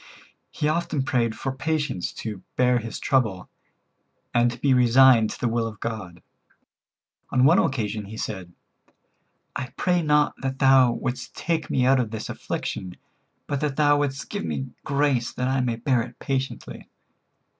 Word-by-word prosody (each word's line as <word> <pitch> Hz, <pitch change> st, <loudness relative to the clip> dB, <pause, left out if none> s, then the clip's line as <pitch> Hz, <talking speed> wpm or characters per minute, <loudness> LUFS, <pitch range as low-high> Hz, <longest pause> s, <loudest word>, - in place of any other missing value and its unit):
He 150 Hz, -, -2 dB
often 155 Hz, -3 st, 0 dB
prayed 120 Hz, -4 st, 0 dB
for 135 Hz, -, -3 dB
patience 145 Hz, -, -2 dB
to 105 Hz, -4 st, -6 dB
bear 125 Hz, -1 st, +3 dB
his 115 Hz, 0 st, -6 dB
trouble, 110 Hz, -9 st, 0 dB, 0.8 s
and 120 Hz, 0 st, +4 dB
to 120 Hz, -, -6 dB
be 135 Hz, +1 st, +3 dB
resigned 125 Hz, -2 st, +6 dB
to -, -, -7 dB
the 125 Hz, -, 0 dB
will 115 Hz, 0 st, 0 dB
of 110 Hz, -2 st, -9 dB
God. 105 Hz, -7 st, -6 dB, 1.1 s
On 130 Hz, 0 st, +3 dB
one 165 Hz, +7 st, +6 dB
occasion 110 Hz, -5 st, -1 dB
he 110 Hz, +2 st, -9 dB
said: 95 Hz, -6 st, -5 dB, 1.0 s
"I 130 Hz, -, -4 dB
pray 180 Hz, -1 st, +2 dB
not 150 Hz, -2 st, +3 dB
that 135 Hz, 0 st, -3 dB
thou 135 Hz, -2 st, +5 dB
wouldst 125 Hz, +1 st, -4 dB
take 165 Hz, -3 st, -2 dB
me 125 Hz, -, +2 dB
out 135 Hz, 0 st, +4 dB
of 120 Hz, -4 st, -1 dB
this 110 Hz, -1 st, -6 dB
affliction, 90 Hz, -1 st, -5 dB, 0.5 s
but 140 Hz, -, -2 dB
that 150 Hz, -3 st, -1 dB
thou 145 Hz, -1 st, +4 dB
wouldst 140 Hz, -1 st, -2 dB
give 205 Hz, -1 st, -3 dB
me 135 Hz, -1 st, -4 dB
grace 140 Hz, -4 st, +1 dB
that 125 Hz, -, -2 dB
I 130 Hz, 0 st, +1 dB
may 120 Hz, -2 st, 0 dB
bear 120 Hz, +1 st, +1 dB
it 120 Hz, +1 st, -8 dB
patiently." 135 Hz, -1 st, -4 dB
130 Hz, 165 wpm, -24 LUFS, 115-140 Hz, 1.1 s, resigned